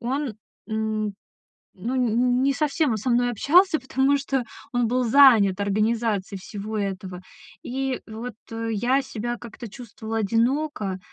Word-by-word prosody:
он, 260 0 -2 0.3
м 220 -1 -2 0.6
ну, 235 +8 -3
нь 245 +1 +2
не 275 +1 +3
совсем 300 0 +1
он - - 0
со 250 +5 -2
мной 245 0 +3
общался, 315 - +4
потому 265 +2 +2
что 270 -2 -1 0.3
он 245 -1 +2
был 250 +2 +1
занят 225 -7 +6
организацией 210 -1 0
всего 210 +3 -6
этого. 190 -2 -4 0.4
И 265 0 -2
вот, 225 +2 -7 0.2
э, 225 0 -3
я 245 +6 +2
себя 240 0 -4
как-то 235 0 -9
чувствовала 225 0 -6
одиноко. 230 -1 0
235 Hz, 140 wpm, -24 LUFS, 215-265 Hz, 0.6 s, занят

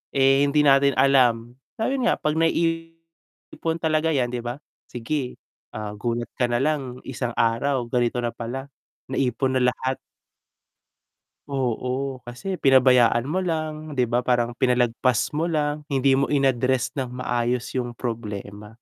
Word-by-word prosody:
Eh, 135 +1 +4
hindi 150 +1 +3
natin 140 -1 +5
alam 125 -2 +3 0.2
na 225 - -2
ayun 270 -2 0
nga - - +3
'pag 150 +1 -1
naiipon 165 0 -3
talaga 155 0 +1
'yan 125 -2 0
'di 125 - -3
ba, 120 +5 -6 0.2
sige, 125 +2 -3 0.4
ah, 105 -1 -4
gulat 120 +3 -3
ka 125 - +3
na 120 0 0
lang 135 -4 -2
isang 125 -2 -4
araw 120 +3 +1
ganito 120 0 0
na 120 - -1
pala, 130 +4 -6 0.4
naipon 130 0 0
na - - +1
lahat. 130 0 -2 1.5
Oo, 130 0 -2
kasi 185 +10 -5
pinabayaan 125 -3 +5
mo 185 - 0
lang 155 -4 -3
'di 125 - +2
ba, 120 - +2
parang 120 -1 +1
pinalagpas 125 -1 +2
mo 160 +3 -1
lang 150 -2 -1
hindi 135 -2 +2
mo 135 0 +1
in-address 130 -2 +1
ng 125 -1 -4
maayos 120 0 -1
yung 120 -1 -4
problema. 105 -3 -6
130 Hz, 145 wpm, -24 LUFS, 120-145 Hz, 1.5 s, natin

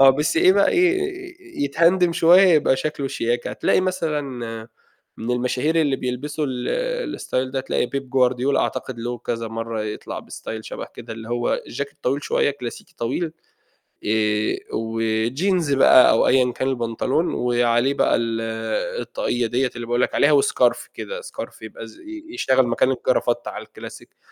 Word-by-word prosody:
آه 135 0 +9
بس 150 +5 0
إيه 185 +3 +6
بقى 200 +1 +4
إيه 365 - -1
يتهندم 170 +4 +3
شوية 175 +2 +6
يبقى 150 -5 +4
شكله 140 0 -3
شياكة، 120 -1 -2
هتلاقي - - +1
مثلًا 175 -5 -1 1.0
من 115 +2 -4
المشاهير 125 +6 0
اللي 145 -4 +1
بيلبسوا 145 +5 -3
ال - - -2
الstyle 130 0 -2
ده 135 - -1
هتلاقي 130 -1 -1
بيب 135 +1 -6
غوارديولا، 130 +1 +2
أعتقد 125 -3 -3
له 120 +1 -4
كذا 115 -1 -4
مرّه 115 0 -4
يطلع 105 - -5
بstyle 110 - -7
شبه - - -7
كده 115 - -8
اللي 115 0 -9
هو 120 0 -1
الجاكيت 140 +3 -6
طويل 140 +3 0
شوية - - +1
كلاسيكي 125 -4 -8
طويل، 145 +8 -2 0.7
آآ، 105 0 +1 0.2
وjeans 115 - 0
بقى 130 -1 +7
أو - - +3
أيًا 125 -1 +3
كان 130 +2 -2
البنطلون، 125 +5 -1
وعليه 120 +2 +2
بقى - - +2
ال 115 -1 -1 0.6
الطاقية 120 -1 -2
دِيَّة 125 +2 0
اللي 120 -1 -5
باقول 120 +1 0
لك - - 0
عليها، 145 -1 +5
وscarf 125 -2 +1
كده - - -6
scarf 485 - -8
يبقى - - -8
ز - - -16
ي 320 -1 -9
يشتغل 130 - +3
مكان 120 +2 +2
الجرافتة 120 -1 0
على - - -7
الكلاسيك - - -12
130 Hz, 160 wpm, -22 LUFS, 120-160 Hz, 1.0 s, آه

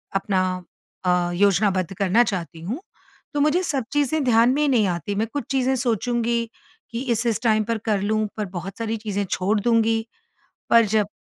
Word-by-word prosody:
अपना 195 -1 +1 0.6
अ, 180 -1 +2
योजनाबद्ध 195 -1 +2
करना 200 +4 +4
चाहती 175 -6 -4
हूँ, 215 - -4 0.5
तो 290 - 0
मुझे 305 +5 +2
सब 280 -7 -1
चीज़ें 290 +1 +1
ध्यान 235 -2 +4
में 290 - 0
ही 300 - +3
नहीं 235 -6 +3
आती। 180 +3 -3
मैं 220 +3 0
कुछ 290 - -2
चीज़ें 265 -1 +2
सोचूँगी 235 -1 0 0.5
कि 230 +1 -3
इस-इस 230 0 0
टाइम 215 -2 +3
पर 230 +1 -1
कर 210 -3 +1
लूँ 215 +2 0
पर 210 - -1
बहुत 185 +3 -6
सारी 225 0 -2
चीज़ें 205 -2 -2
छोड़ 205 +3 +1
दूँगी। 225 0 +2 0.7
पर 230 0 +7
जब 210 0 +1
220 Hz, 175 wpm, -23 LUFS, 200-240 Hz, 0.7 s, पर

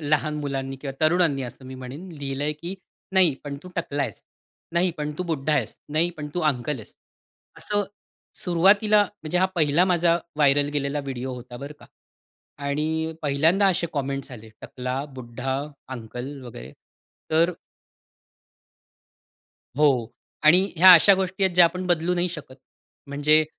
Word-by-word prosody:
लहान 150 +1 +1
मुलांनी 135 -2 -3
किंवा 135 -1 -5
तरुणांनी 155 -3 +3
असं 130 +1 -8
मी 130 - -8
म्हणेन 130 +8 -8
लिहिलंय, 140 +1 -2
की 170 +5 -6 0.4
"नाही, 185 -6 +4
पण 145 -1 -5
तू 180 - -10
टकला 145 -4 -1
आहेस, 115 -7 -5 0.5
नाही 175 +2 +2
पण 150 0 -3
तू - - 0
बुड्ढा 155 -3 -1
आहेस, - - -1 0.2
नाही 165 +3 +2
पण 150 -1 -6
तू 180 - 0
अंकल 135 +2 -3
आहेस." 110 - -13 0.6
असं 205 -1 -1 0.6
सुरुवातीला 200 +4 +4
म्हणजे 180 -4 -4
हा 185 - +4
पहिला 160 0 +3
माझा 170 -2 +3 0.2
व्हायरल 145 -1 +3
गेलेला 145 0 -1
व्हिडिओ 130 -2 -5
होता 125 0 -9
बरं 140 +4 -7
का. - - -14 0.8
आणि 160 +3 -1
पहिल्यांदा 155 +7 +3
असे 175 -2 +1
कॉमेंट्स 140 -1 -3
आले 110 +1 -14
टकला, 130 +2 -4
बुड्ढा, 130 +2 -4 0.4
अंकल 125 +5 -7
वगैरे 70 - -10 0.6
तर 165 +3 +3 2.3
हो 150 0 +6 0.6
आणि 165 +4 +7 0.2
ह्या 185 +3 +10
अशा 195 +4 +7
गोष्टी 190 +1 -1
आहेत 185 -2 +1
ज्या 180 0 +8
आपण 180 +2 -1
बदलू 175 0 +1
नाही 175 +1 0
शकत. 150 -6 -9 0.5
म्हणजे 150 +2 +3
150 Hz, 150 wpm, -24 LUFS, 135-175 Hz, 2.3 s, ह्या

